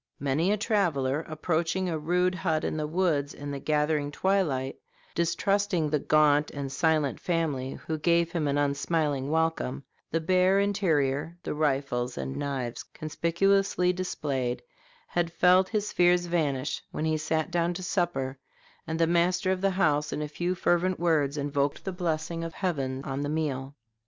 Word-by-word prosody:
Many 145 +7 +1
a 210 - +2
traveler, 165 - +1
approaching 165 +3 -1
a 160 -3 -2
rude 180 +4 +1
hut 160 -4 -1
in - - -1
the 155 -1 -2
woods 155 -4 0
in 145 0 -6
the 140 - -4
gathering 150 0 +1
twilight, 145 -6 0 0.4
distrusting 170 -1 +1
the 150 - +2
gaunt 150 0 +3
and 140 -2 -5
silent 155 -3 +1
family 150 -7 -1
who 160 -1 -2
gave 170 +1 +2
him 165 -4 -1
an 140 0 +1
unsmiling 145 -1 0
welcome, 160 -4 0 0.3
the 165 - 0
bare 185 +3 +3
interior, 165 -6 +1
the - - -3
rifles 135 -4 -1
and 65 -1 -4
knives 130 -4 -3
conspicuously 180 +3 +1
displayed, 135 -9 -2 0.5
has 175 -1 0
felt 185 +1 +5
his 210 -2 -2
fears 175 0 +4
vanish 150 -5 -1
when 155 - -3
he 155 0 +1
sat 155 +1 -1
down 170 0 +1
to 185 - -5
supper, 140 -8 -1 0.5
and 160 0 -2
the 165 - +4
master 175 +3 +2
of 185 -1 -1
the 195 - +3
house, 150 -6 +1
in 150 - -2
a - - -3
few 175 +5 -2
fervent 180 +1 +1
words, 155 -4 +1
invoked 140 0 -1
the 190 - -2
blessing 165 -2 -2
of 165 -1 -6
heaven 135 -8 -2
on 140 -1 -3
the 145 - -2
meal. 140 -3 -2
160 Hz, 160 wpm, -28 LUFS, 145-175 Hz, 0.5 s, felt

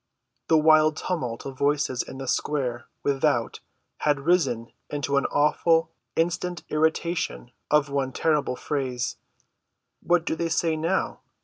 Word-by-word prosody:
The 160 - +5
wild 155 0 +5
tumult 125 -11 -3
of 135 -1 -7
voices 140 -3 +1
in 130 - -8
the 135 0 -6
square 125 -3 -1 0.2
without 140 -1 +1 0.4
had 145 -2 +1
risen 140 -8 +1 0.2
into 145 -1 -1
an 140 - +2
awful, 160 +2 +2 0.2
insistent 175 +1 -1
iteration 160 - 0 0.2
of 150 -1 +4
one 135 -2 0
terrible 150 -2 +1
phrase. 130 -4 -2 0.8
"What 175 -1 +2
do - - 0
they 165 0 -2
say 165 -1 +1
now?" 165 +5 -1
150 Hz, 130 wpm, -25 LUFS, 135-165 Hz, 0.8 s, The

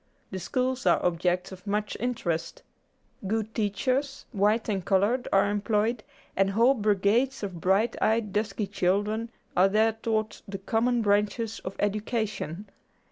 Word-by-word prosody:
The 190 - -4
schools 255 +8 -1
are - - +5
objects 180 +1 0
of 185 +1 -11
much 210 +1 -1
interest. 175 -9 -2 0.6
Good 220 +1 -1
teachers, 255 +6 -1
white 210 +1 +2
and 195 -4 -1
colored, 205 +7 +2
are 195 +1 +4
employed, 210 +2 0 0.3
and 195 0 +3
whole 230 +7 +4
brigades 215 +3 +1
of 180 -4 -5
bright 195 +6 +2
eyed 220 -2 +1
dusky 210 0 -1
children 205 +4 0 0.3
are 190 +2 +5
there 220 +2 +3
taught 220 -1 -2
the 195 0 -5
common 230 +4 +1
branches 210 +2 +1
of 190 - -7
education. 205 -3 -2
210 Hz, 135 wpm, -27 LUFS, 195-225 Hz, 0.6 s, are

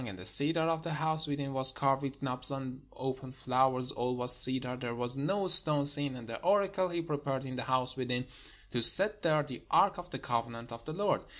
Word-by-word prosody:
And 105 -6 -11
the 90 - -13
cedar 155 - +6
of 160 0 -3
the 165 0 -7
house 155 0 +2
within 140 -1 -7
was 130 0 +4
carved 135 0 -3
with 140 0 -9
knops 125 -1 -4
and 135 -1 -9
open 130 0 -8
flowers: 130 0 -1
all 125 -1 -5
was 125 0 +3
cedar; 125 0 -4
there 120 -2 -8
was 120 +1 -2
no 190 +8 -4
stone 160 -6 +7
seen. 145 -2 +8
And 120 -2 -12
the 115 - -10
oracle 195 -2 -2
he 170 -1 -6
prepared 140 -4 -7
in 130 -1 -9
the 125 - -6
house 130 -1 -4
within, 125 -1 -5 0.5
to 120 - -4
set 205 - +2
there 155 -2 -1
the 130 -4 -12
ark 200 -1 0
of 175 0 -13
the - - -8
covenant 115 0 -7
of 115 0 -12
the 155 - -9
Lord. 205 +5 -3
135 Hz, 220 wpm, -28 LUFS, 125-155 Hz, 0.5 s, seen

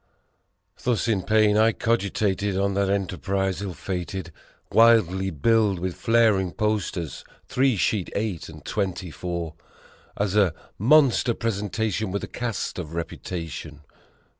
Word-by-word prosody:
Thus 120 -3 0
in 105 -5 +1
pain 105 +1 +3
I 110 +1 +4
cogitated 100 -3 0
on 100 0 +1
that 100 0 +1
enterprise 95 0 -1
ill 95 -4 -4
fated, 90 -1 -4 0.4
Widely 100 -5 +4
billed 105 +4 +2
with 90 +1 -3
flaring 110 -6 +2
posters 105 - -2 0.2
three 130 -3 +2
sheet, 95 0 0
eight, 100 -7 -2
and 75 -2 -12
twenty 95 -4 -2
four 85 -2 -4 0.6
As 100 -1 0
a 95 -6 +3 0.2
"Monster 130 -1 +4
Presentation 110 -1 -2
with 100 - -2
a - - -4
Cast 120 -6 -3
of 80 -3 -6
Reputa 85 0 -4
tion." 75 0 -8
100 Hz, 130 wpm, -25 LUFS, 90-110 Hz, 0.6 s, I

